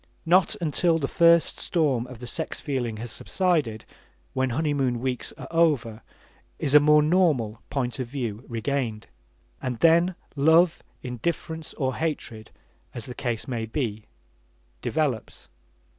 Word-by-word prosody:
Not 185 +5 +4
until 165 0 +2
the 140 -4 -1
first 170 +1 +4
storm 140 -8 0
of 125 -1 -10
the 125 - -8
sex 160 +6 -3
feeling 125 -6 -2
has 115 +1 -5
subsided, 145 - 0 0.5
when 130 0 0
honeymoon 135 -3 0
weeks 125 -1 -2
are - - -8
over, 150 -10 +2 0.6
is 140 - -1
a 150 - +10
more 150 +1 +5
normal 150 - +2
point 130 -2 -2
of 130 - -2
view 120 -4 -4
regained. 115 -2 -2 0.6
And 125 -2 -3
then 170 +5 +4 0.2
love, 160 +4 +4 0.2
indifference, 160 +5 -4
or 130 -3 -1
hatred, 125 -9 -3 0.5
as 115 - -5
the 125 - -7
case 120 -3 -3
may 115 -4 -3
be 110 -4 -3 0.7
develops. 145 -8 -2
135 Hz, 135 wpm, -25 LUFS, 120-160 Hz, 0.7 s, a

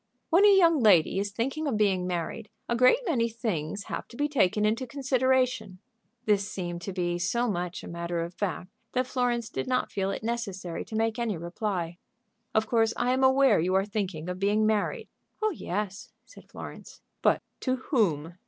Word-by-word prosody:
"When 355 +5 +6
a 405 -1 +7
young 335 -4 +5
lady 195 -6 +5
is 205 +1 -1
thinking 270 +9 -2
of 245 -6 0
being 190 -4 +2
married, 180 +4 -3 0.2
a 235 - 0
great 255 - +6
many 240 - +1
things 205 -5 -3
have - - -5
to 235 - -13
be 290 - +1
taken 210 -7 +2
into 230 +4 0
consideration." 255 -6 +1 0.5
This 205 -2 +2
seemed 175 -2 -4
to 195 - -5
be 175 -2 -1
so 235 +8 0
much 180 -4 -3
a - - -8
matter 170 0 -3
of 170 +1 -5
fact 185 -1 -3 0.2
that 255 0 +1
Florence 245 -3 0
did - - -4
not 255 0 0
feel 195 -1 -1
it 195 - -4
necessary 200 -7 -3
to 220 - -7
make 225 +1 0
any 225 -6 -1
reply. 175 0 -3 0.6
"Of 220 0 +3
course 225 0 +2
I 250 - +2
am 260 +1 +1
aware 265 -5 +5
you 180 +3 +1
are 195 +1 +3
thinking 195 -6 -3
of 180 0 -4
being 205 +2 +2
married." 215 -1 0 0.3
"Oh 435 0 +1
yes," 205 - -4
said - - -16
Florence. - - -10 0.2
"But - - +3 0.2
to 255 -1 0
whom?" 185 - 0
215 Hz, 190 wpm, -28 LUFS, 180-250 Hz, 0.6 s, a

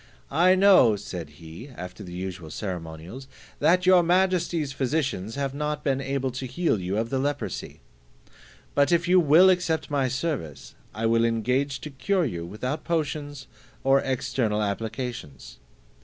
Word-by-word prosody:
"I 175 +6 +5
know," 185 - +6
said 90 -5 -7
he, 85 - -10
after 90 -4 -9
the 90 - -9
usual 90 -2 -6
ceremonials, 90 - -6 0.3
"that 180 +1 +3
your 185 -1 +7
majesty's 175 -4 +1
physicians 135 -7 -2
have 140 -1 -2
not 150 +1 -3
been 135 -1 0
able 135 -1 -2
to 130 +1 -5
heal 130 - 0
you 95 +2 -2
of 115 +1 -2
the 135 - 0
leprosy; 145 +1 -4 0.9
but 140 +3 +3
if 170 0 +2
you 185 +1 +6
will 170 +4 +6
accept 170 -4 -1
my 140 -2 +1
service, 125 - -4 0.2
I 110 +1 -3
will 115 0 +3
engage 125 +4 0
to 150 - -7
cure 180 +7 0
you 85 - -4
without 125 - -4
potions, 145 -4 -3 0.4
or 135 +1 +4
external 125 -5 -1
applications." 105 - -5
135 Hz, 150 wpm, -25 LUFS, 105-155 Hz, 0.9 s, your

